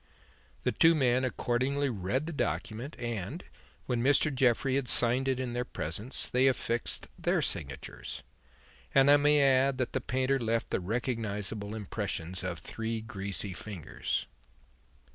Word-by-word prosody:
The -, -, +2 dB
two 165 Hz, 0 st, +5 dB
men 130 Hz, -3 st, +3 dB
accordingly 130 Hz, +3 st, 0 dB
read 110 Hz, +7 st, -1 dB
the 170 Hz, -, -5 dB
document, 110 Hz, -, -3 dB
and, 120 Hz, -, -4 dB, 0.4 s
when 120 Hz, -2 st, -1 dB
Mr. 145 Hz, +3 st, +3 dB
Jeffrey 130 Hz, 0 st, +2 dB
had 135 Hz, -2 st, 0 dB
signed 125 Hz, +3 st, +4 dB
it 130 Hz, -1 st, +1 dB
in 125 Hz, -2 st, -3 dB
their 120 Hz, 0 st, -1 dB
presence, 105 Hz, -, -1 dB
they 130 Hz, +2 st, +3 dB
affixed 120 Hz, -2 st, -1 dB
their -, -, +2 dB
signatures; -, -, -4 dB, 0.7 s
and 135 Hz, +1 st, +7 dB
I 145 Hz, -, +8 dB
may 150 Hz, +1 st, +4 dB
add 135 Hz, 0 st, +4 dB
that 125 Hz, -2 st, -2 dB
the -, -, 0 dB
painter 130 Hz, +1 st, 0 dB
left 115 Hz, -1 st, -1 dB
the -, -, +1 dB
recognizable 105 Hz, -1 st, -3 dB
impressions 90 Hz, -3 st, -4 dB
of 90 Hz, -2 st, -3 dB
three 115 Hz, +3 st, -4 dB
greasy 100 Hz, -2 st, -4 dB
fingers." 95 Hz, -4 st, -4 dB
120 Hz, 145 wpm, -30 LUFS, 105-135 Hz, 0.7 s, I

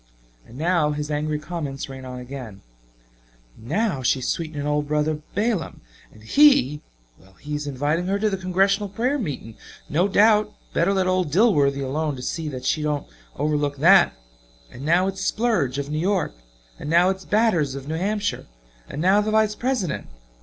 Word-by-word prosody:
And 120 Hz, -, -13 dB
now 160 Hz, -1 st, +1 dB
his 150 Hz, +1 st, -4 dB
angry 150 Hz, +1 st, -1 dB
comments 150 Hz, -3 st, -5 dB
ran 130 Hz, -1 st, -9 dB
on 125 Hz, 0 st, -7 dB
again: 125 Hz, -6 st, -8 dB, 0.9 s
"Now 165 Hz, -, -1 dB
she's 130 Hz, 0 st, +1 dB
sweetening 155 Hz, -3 st, -3 dB
old 150 Hz, 0 st, 0 dB
Brother 150 Hz, +1 st, 0 dB
Balaam; 210 Hz, -3 st, -1 dB, 0.3 s
and 110 Hz, -, -17 dB
he 150 Hz, -, +4 dB, 0.4 s
well 95 Hz, +1 st, -21 dB
he 150 Hz, +10 st, -8 dB
is 150 Hz, 0 st, -3 dB
inviting 145 Hz, +6 st, -1 dB
her 195 Hz, +1 st, +1 dB
to 215 Hz, +2 st, +1 dB
the 200 Hz, -, 0 dB
Congressional 195 Hz, +2 st, +1 dB
prayer 250 Hz, +8 st, -1 dB
meeting, 135 Hz, -, -5 dB, 0.3 s
no 175 Hz, +6 st, +2 dB
doubt 210 Hz, +1 st, +3 dB, 0.2 s
better 170 Hz, +4 st, +2 dB
let 190 Hz, -1 st, +1 dB
old 185 Hz, -3 st, +1 dB
Dilworthy 145 Hz, -, +3 dB
alone 150 Hz, +2 st, -2 dB
to 125 Hz, -, -8 dB
see 160 Hz, +4 st, -3 dB
that 130 Hz, -4 st, -6 dB
she 155 Hz, -, +1 dB
doesn't 150 Hz, -1 st, -1 dB, 0.3 s
overlook 145 Hz, -1 st, -1 dB
that. 175 Hz, +5 st, +6 dB, 0.6 s
And 125 Hz, -, -10 dB
now 170 Hz, +5 st, +3 dB
its 195 Hz, 0 st, -3 dB
Splurge, 195 Hz, -, 0 dB
of 140 Hz, +1 st, -4 dB
New 155 Hz, -, -1 dB
York; 185 Hz, 0 st, 0 dB, 0.5 s
and 150 Hz, -, -6 dB
now 175 Hz, +3 st, +4 dB
its 190 Hz, 0 st, -6 dB
Batters 180 Hz, -11 st, +1 dB
of 140 Hz, 0 st, -8 dB
New 155 Hz, -, -3 dB
Hampshire 205 Hz, +4 st, -2 dB, 0.4 s
and 150 Hz, -, -4 dB
now 195 Hz, +3 st, +5 dB
the 210 Hz, -, -2 dB
Vice 215 Hz, -1 st, +2 dB
President! 235 Hz, -, -2 dB
155 Hz, 175 wpm, -23 LUFS, 145-195 Hz, 0.9 s, that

